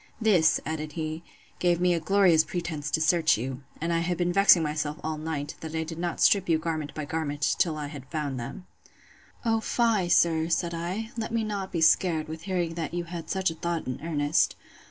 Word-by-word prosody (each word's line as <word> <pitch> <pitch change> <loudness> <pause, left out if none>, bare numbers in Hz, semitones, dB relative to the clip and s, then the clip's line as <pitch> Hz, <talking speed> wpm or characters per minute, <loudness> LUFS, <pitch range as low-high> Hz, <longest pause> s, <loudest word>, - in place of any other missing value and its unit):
This, 190 -8 +4
added 155 -1 -4
he, 155 0 -4 0.4
gave 175 -1 +2
me 180 0 +3
a 170 - 0
glorious 175 -2 +4
pretence 160 -5 -4
to 160 - +1
search 160 -2 +3
you; 130 +3 -5 0.2
and 170 +2 -1
I 165 - +2
have 175 +1 -1
been 175 0 0
vexing 195 -3 +6
myself 150 0 -2
all 155 -1 -3
night, 155 -2 -4
that 160 0 -7
I 160 - 0
did 165 +1 -7
not 175 -1 -3
strip 195 -3 +4
you 165 - +4
garment 155 -3 -4
by 155 - -4
garment, 145 -1 -1
till 160 -3 +2
I 150 - -4
had 145 -3 -9
found 145 -5 -3
them. 120 +10 -7 0.8
O 225 -1 +2
fie, 220 -5 +1
sir, 165 -2 +3
said 170 0 0
I; 185 +7 -4
let 225 0 -3
me 230 -1 0
not 200 -3 -4
be 170 - -2
scared, 160 -1 +3
with 160 0 -6
hearing 175 -3 0
that 165 0 -4
you 175 - -1
had 170 -1 -7
such 190 -3 0
a - - -5
thought 170 0 -3
in 130 - -5
earnest. 150 -1 +1
165 Hz, 215 wpm, -27 LUFS, 155-175 Hz, 0.8 s, vexing